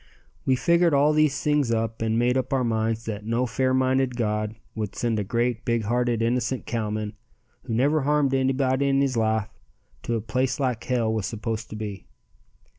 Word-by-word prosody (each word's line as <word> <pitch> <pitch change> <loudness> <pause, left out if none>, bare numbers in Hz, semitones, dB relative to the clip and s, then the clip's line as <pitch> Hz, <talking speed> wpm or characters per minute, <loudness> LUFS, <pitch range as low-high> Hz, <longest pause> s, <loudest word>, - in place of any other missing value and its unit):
We 130 - +4
figured 170 +5 +3
all 145 +2 +4
these 155 -2 +2
things 150 -4 +2
up 115 0 -1
and 115 0 +1
made 120 +1 +2
up 130 -1 -1
our 130 -1 +2
minds 115 -1 -1
that 105 -2 -4
no 115 +3 0
fair 130 +1 0
minded 130 -1 +2
God 105 -1 -1 0.2
would 110 -3 -4
send 115 -3 0
a - - 0
great, 120 +3 -1
big 115 -1 0
hearted, 120 +1 0
innocent 125 +2 0
cowman, 110 -2 -2 0.5
who 115 -3 -2
never 145 +6 +2
harmed 145 -1 +2
anybody 135 +1 +1
in 135 0 +3
his 135 -2 +1
life, 110 -2 +1 0.5
to 120 - -2
a 115 - -1
place 130 +5 -1
like 125 -4 -1
hell 115 -3 +1
was 110 -3 -1
supposed 110 0 -4
to - - -7
be. 105 -2 -6
120 Hz, 190 wpm, -25 LUFS, 110-130 Hz, 0.5 s, We